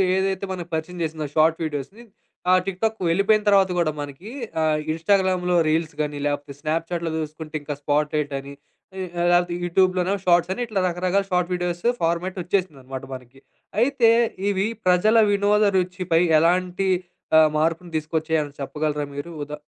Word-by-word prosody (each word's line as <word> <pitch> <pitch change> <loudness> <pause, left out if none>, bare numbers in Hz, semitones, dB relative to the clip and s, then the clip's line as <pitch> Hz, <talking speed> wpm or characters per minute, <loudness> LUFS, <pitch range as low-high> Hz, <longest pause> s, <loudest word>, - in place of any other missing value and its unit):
ఏదైతే 190 0 0
మనకు 175 -2 -5
పరిచయం 160 +3 -3
జేసిందో 155 -1 -3
షార్ట్ 160 +1 +3
వీడియోస్‌ని 155 - -5 0.5
ఆహ్, 185 - +6
టిక్ 190 -2 -4
టాక్ 220 0 +1
వెళ్ళిపోయిన 200 +5 +3
తర్వాత 195 -2 +5
గూడా 160 -3 +2
మనకి 145 +8 -8 0.3
ఆహ్, 155 -1 +2
ఇన్‌స్టా‌గ్రామ్‌లో 180 +1 +1
రీల్స్ 160 +1 0
గాని, 150 -1 -3
లేపోతే 145 0 -3
స్నాప్‌చా‌ట్‌లో 165 +2 -2
జూసుకుంటే 155 0 -6
ఇంకా 145 0 -4
స్పాట్‌లైట్ 150 0 0
అని 140 +1 -10 0.5
ఈ - - -2 0.3
లేపోతే 175 0 +3
యూట్యూబ్‌లోనో 185 +1 +2
షార్ట్స్ 175 0 +3
అని 245 - -5
ఇట్లా 215 -3 -1
రకరకాల 180 +3 0
షార్ట్ 180 -1 0
వీడియోస్ 175 0 -3 0.2
ఫార్మాట్ 170 +3 0
ఒచ్చేసిందనమాట 140 -8 -3
మనకి. 130 +1 -11 0.4
అయితే 250 -2 +4 0.4
ఇవి 200 0 +1 0.2
ప్రజల 185 +5 +4
వినోద 205 +1 +3
రుచిపై 180 -2 +1 0.2
ఎలాంటి 180 +3 +1 0.5
ఆహ్, 155 -1 +6
మార్పును 165 +2 -1
దీసుకొచ్చాయని 155 -1 -1
చెప్పగలరా 150 +1 -2
మీరు? 145 +4 -6
ఉదా 150 +1 -6
170 Hz, 145 wpm, -23 LUFS, 155-185 Hz, 0.5 s, ఆహ్